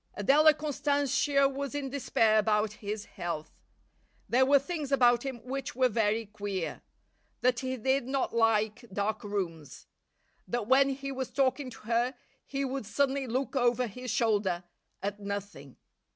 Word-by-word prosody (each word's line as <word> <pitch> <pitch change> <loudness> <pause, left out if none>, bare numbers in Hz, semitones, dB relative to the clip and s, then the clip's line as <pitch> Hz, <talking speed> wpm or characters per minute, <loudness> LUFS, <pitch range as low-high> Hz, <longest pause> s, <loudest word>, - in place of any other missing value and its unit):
Adela 290 +9 +6
Constantia 285 -1 +1
was 275 0 -4
in 275 -2 -3
despair 225 -5 +3
about 210 0 +1
his 205 0 -4
health. 165 -3 -5 0.8
There 260 +2 +3
were 280 +1 +7
things 290 0 -4
about 245 -3 +5
him 260 -4 -6
which 275 +2 -4
were 255 -1 +3
very 220 0 +1
queer; 200 -4 -4 0.6
that 245 -1 +2
he 260 0 -3
did 265 +2 +1
not 265 -3 -1
like 220 0 +2
dark 205 +3 -2
rooms. 175 -8 -4 0.6
That 240 -2 -2
when 270 +4 +5
he 275 0 -4
was 260 -2 -4
talking 270 0 0
to 225 - -12
her 235 +3 0 0.3
he 275 0 -2
would 265 -4 -4
suddenly 275 +2 0
look 255 +3 -2
over 245 -1 +2
his 250 +3 -7
shoulder 205 -6 +1 0.4
at 205 +1 -3
nothing. 200 -9 -6
245 Hz, 150 wpm, -30 LUFS, 210-275 Hz, 0.8 s, were